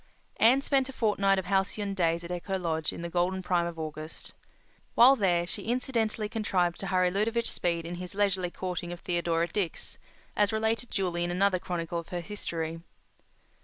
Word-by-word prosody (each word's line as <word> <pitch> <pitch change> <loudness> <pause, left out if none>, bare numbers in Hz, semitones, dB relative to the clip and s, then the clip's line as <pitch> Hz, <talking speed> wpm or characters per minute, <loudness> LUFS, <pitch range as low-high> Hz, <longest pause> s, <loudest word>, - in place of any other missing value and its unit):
Anne 250 +5 +5
spent 270 -1 +2
a - - -4
fortnight 200 -4 +2
of 190 - -2
halcyon 195 +1 0
days 170 -3 +1
at 170 - -7
Echo 185 +2 -2
Lodge 160 -3 -1
in 170 - -7
the - - -2
golden 180 +2 0
prime 175 -1 +1
of 170 -1 -6
August. 155 0 -7 0.6
While 255 +4 +8
there 180 -7 +2
she - - -4
incidentally 230 -3 0
contrived 190 -6 0
to 195 - -4
hurry 185 -1 +2
Ludovic 225 +4 0
Speed 170 -1 -1
in 170 - -5
his 180 +1 -6
leisurely 195 -3 +1
courting 175 -1 -4
of 175 - -7
Theodora 170 -1 0
Dix, 195 -6 -3 0.4
as 205 -1 +3
related 220 +2 0
duly 175 -3 -1
in 175 - -1
another 185 +1 +2
chronicle 170 -1 -3
of 170 - -10
her 175 -1 -3
history. 165 -4 -4
185 Hz, 180 wpm, -29 LUFS, 170-210 Hz, 0.6 s, While